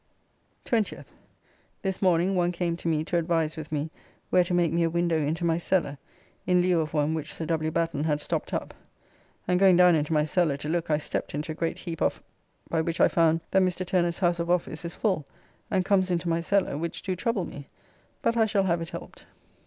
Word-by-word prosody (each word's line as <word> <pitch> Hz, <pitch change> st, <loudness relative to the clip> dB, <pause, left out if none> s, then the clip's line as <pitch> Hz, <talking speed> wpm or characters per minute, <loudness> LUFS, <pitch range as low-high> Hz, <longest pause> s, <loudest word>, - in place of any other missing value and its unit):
20th. 225 Hz, -4 st, -1 dB, 0.7 s
This 190 Hz, -2 st, -2 dB
morning 185 Hz, 0 st, +3 dB
one 175 Hz, -1 st, +2 dB
came 170 Hz, -1 st, -1 dB
to 170 Hz, -, -6 dB
me 155 Hz, -2 st, +1 dB
to 175 Hz, +2 st, -1 dB
advise 165 Hz, -2 st, 0 dB
with 155 Hz, -2 st, -8 dB
me 155 Hz, +1 st, -2 dB, 0.4 s
where 180 Hz, -, +5 dB
to 175 Hz, -, -5 dB
make 170 Hz, -3 st, +2 dB
me 170 Hz, -, +2 dB
a 165 Hz, -, +2 dB
window 170 Hz, -1 st, +1 dB
into 160 Hz, +3 st, -1 dB
my 165 Hz, 0 st, +2 dB
cellar 165 Hz, -6 st, 0 dB, 0.5 s
in 180 Hz, 0 st, +4 dB
lieu 180 Hz, -2 st, +3 dB
of 155 Hz, 0 st, -4 dB
one 150 Hz, +1 st, +2 dB
which 160 Hz, -1 st, -4 dB
Sir 165 Hz, -, -4 dB
W. 155 Hz, 0 st, 0 dB
Batten 165 Hz, -2 st, -1 dB
had 150 Hz, -2 st, +1 dB
stopped -, -, -3 dB
up, -, -, -3 dB, 0.7 s
and 180 Hz, 0 st, +2 dB
going 190 Hz, -2 st, +6 dB
down 180 Hz, -1 st, +7 dB
into 155 Hz, -1 st, 0 dB
my 150 Hz, -1 st, +3 dB
cellar 155 Hz, -2 st, +1 dB
to 145 Hz, -, -6 dB
look 170 Hz, 0 st, -1 dB
I 150 Hz, -, +3 dB
stepped 150 Hz, -, -4 dB
into 150 Hz, +2 st, -3 dB
a -, -, -3 dB
great 165 Hz, 0 st, -2 dB
heap 165 Hz, -3 st, -6 dB
of -, -, 0 dB, 0.4 s
by 165 Hz, -, 0 dB
which 165 Hz, +1 st, -3 dB
I -, -, +6 dB
found 165 Hz, -1 st, +3 dB
that 190 Hz, -, +4 dB
Mr. 185 Hz, 0 st, 0 dB
Turner's 175 Hz, -2 st, +1 dB
house 175 Hz, -2 st, +1 dB
of 170 Hz, 0 st, -2 dB
office 175 Hz, -2 st, 0 dB
is 170 Hz, -, -6 dB
full 190 Hz, -8 st, 0 dB, 0.5 s
and 185 Hz, -2 st, +1 dB
comes 190 Hz, -2 st, +2 dB
into 175 Hz, -1 st, -1 dB
my 165 Hz, 0 st, +1 dB
cellar, 185 Hz, -5 st, 0 dB
which 170 Hz, +1 st, -4 dB
do 185 Hz, -, -2 dB
trouble 210 Hz, -1 st, -1 dB
me, 140 Hz, -1 st, -9 dB, 0.6 s
but 230 Hz, -, +2 dB
I 225 Hz, -1 st, +3 dB
shall 200 Hz, -2 st, +2 dB
have 170 Hz, -2 st, +1 dB
it 165 Hz, -, -5 dB
helped. -, -, -10 dB
170 Hz, 225 wpm, -27 LUFS, 160-180 Hz, 0.7 s, down